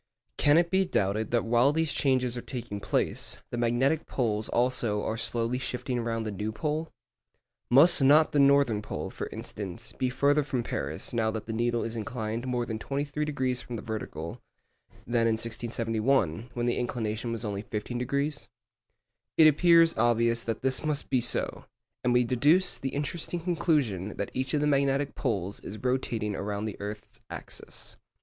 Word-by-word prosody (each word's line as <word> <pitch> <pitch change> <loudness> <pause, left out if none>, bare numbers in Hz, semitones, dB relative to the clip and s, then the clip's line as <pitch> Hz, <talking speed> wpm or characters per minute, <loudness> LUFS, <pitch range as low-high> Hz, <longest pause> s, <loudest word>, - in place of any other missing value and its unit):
Can 145 +2 +5
it 170 0 +3
be 190 0 +4
doubted 110 - 0
that 120 -1 +1
while 120 +4 +4
these 160 0 0
changes 130 -3 +1
are 120 - -4
taking 115 -6 -6
place, - - -1
the 120 - -3
magnetic 125 +6 +1
poles 110 -4 -1
also 120 -4 0
are 110 - -1
slowly 115 +2 -1
shifting 125 -1 -3
round 115 -1 -2
the 110 - -3
true 105 +2 -3
pole? 155 +6 -2 0.8
Must 145 +6 +6
not 150 +4 +6
the 145 - +2
northern 140 -6 +4
pole, - - -5
for - - -5
instance, 105 +2 -6
be 130 - -1
further 145 +4 +2
from 130 -4 -2
Paris 75 - -3
now 115 -2 +1
that 110 -1 -4
the 110 - -4
needle 120 +1 0
is 115 0 -4
inclined 115 +1 -4
more 125 -1 0
than 110 -2 -4
23° 140 -2 -2
from 120 - -6
the 110 - -6
vertical, 85 -7 -5 0.6
than 115 -1 +2
in 115 - +3
1671, 115 - 0
when 120 -1 -1
the 120 - +1
inclination 115 -1 -2
was 115 0 -4
only 100 -1 -3
15°? 125 +7 -3 0.9
It 160 - +8
appears 165 +2 +5
obvious 115 0 +3
that 115 0 -4
this 130 +1 +1
must 150 -2 -2
be 130 -2 +3
so, 120 - -1 0.4
and 125 - +2
we 125 0 +4
deduce 145 +10 +3
the 135 - -2
interesting 150 +5 -2
conclusion 150 - 0
that 100 - -3
each 130 +2 -1
of 145 - +1
the - - +2
magnetic 140 -1 +2
poles 100 -7 -2
is 105 - -8
rotating 115 -4 -1
around 100 +1 -3
the 110 - -5
earth's 105 +1 -7
axis. - - -7
120 Hz, 170 wpm, -28 LUFS, 110-140 Hz, 0.9 s, It